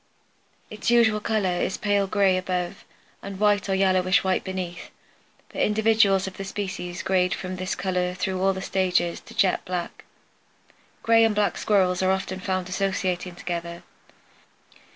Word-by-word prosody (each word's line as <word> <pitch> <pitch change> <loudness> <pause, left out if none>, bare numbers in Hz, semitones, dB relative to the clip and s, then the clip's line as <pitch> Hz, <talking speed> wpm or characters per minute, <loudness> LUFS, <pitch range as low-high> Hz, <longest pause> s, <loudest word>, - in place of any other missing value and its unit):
Its 215 +1 -3
usual 230 -3 +4
color 205 -5 0
is 190 - -1
pale 205 -1 +1
gray 195 -1 +3
above 185 0 -3 0.4
and 195 -1 -7
white 205 -1 +2
or 190 - +2
yellowish 185 -1 +3
white 190 -1 0
beneath, 185 -2 -5 0.6
but - - -4
individuals 210 -2 +3
of 190 -1 -7
the 195 - -5
species 185 -3 -5
grade 180 -2 +1
from 185 +1 -6
this 185 0 -3
color 180 -1 -1
through 185 0 -2
all 195 0 +3
the 190 0 -5
stages 180 -3 0
to 230 - -15
jet 195 -4 +2
black. 180 -1 -5 1.0
Gray 225 0 +5
and 225 -2 +2
black 205 -3 +1
Squirrels 185 -3 +2
are 185 - +2
often 190 0 -1
found 185 -1 -2
associating 185 -2 -2
together. 170 -1 -5
190 Hz, 150 wpm, -25 LUFS, 180-200 Hz, 1.0 s, Gray